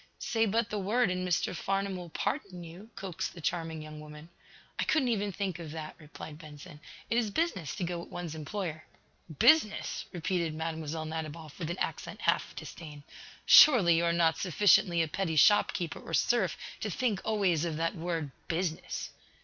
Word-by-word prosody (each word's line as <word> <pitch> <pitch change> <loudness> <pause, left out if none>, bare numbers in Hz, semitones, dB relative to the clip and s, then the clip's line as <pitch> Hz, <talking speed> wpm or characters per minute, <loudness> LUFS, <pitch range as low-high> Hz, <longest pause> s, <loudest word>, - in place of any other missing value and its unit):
"Say 225 -1 0
but 225 +2 0
the 210 - -1
word, 210 +2 +2
and 185 0 -2
Mr. 180 +1 0
Farnum 195 +1 -1
will 175 -2 -7
pardon 185 - -3
you," 175 +6 -11
coaxed 185 -3 -5
the - - -9
charming 165 -2 -3
young 155 0 -9
Woman. 150 +1 -11 0.5
"I - - +2
couldn't 285 -5 +2
even 205 -3 0
think 190 -2 -3
of 165 -2 -7
that," 155 -1 -6
replied 150 0 -10
Benson. 150 -2 -11 0.3
"It 235 - +4
is 225 -3 -1
business 190 - -1
to - - -4
go 175 0 -2
with 170 - -9
one's 175 -3 -5
employer." 160 0 -5 0.5
"Business?" 300 - +3
repeated 170 -2 -1
Mlle. 160 -1 -4
Nadiboff, 155 0 -6
with 165 -2 -3
an 175 - -3
accent - - -4
half - - +1
of - - -17
disdain. 150 -3 -9 0.4
"Surely, 205 - +8
you 170 +1 +2
are 170 - +3
not 165 -1 +2
sufficiently 180 -2 +4
a - - -2
petty 165 +1 -2
shop 205 +8 +6
keeper 170 -4 -4
or 165 - -3
serf 190 - +2 0.2
to 215 - -3
think 215 -1 -1
always 195 -7 +1
of 165 -3 -2
that 165 +1 0
word, 165 -5 -3 0.2
'business!'" 165 -1 -3
170 Hz, 180 wpm, -30 LUFS, 160-195 Hz, 0.5 s, Surely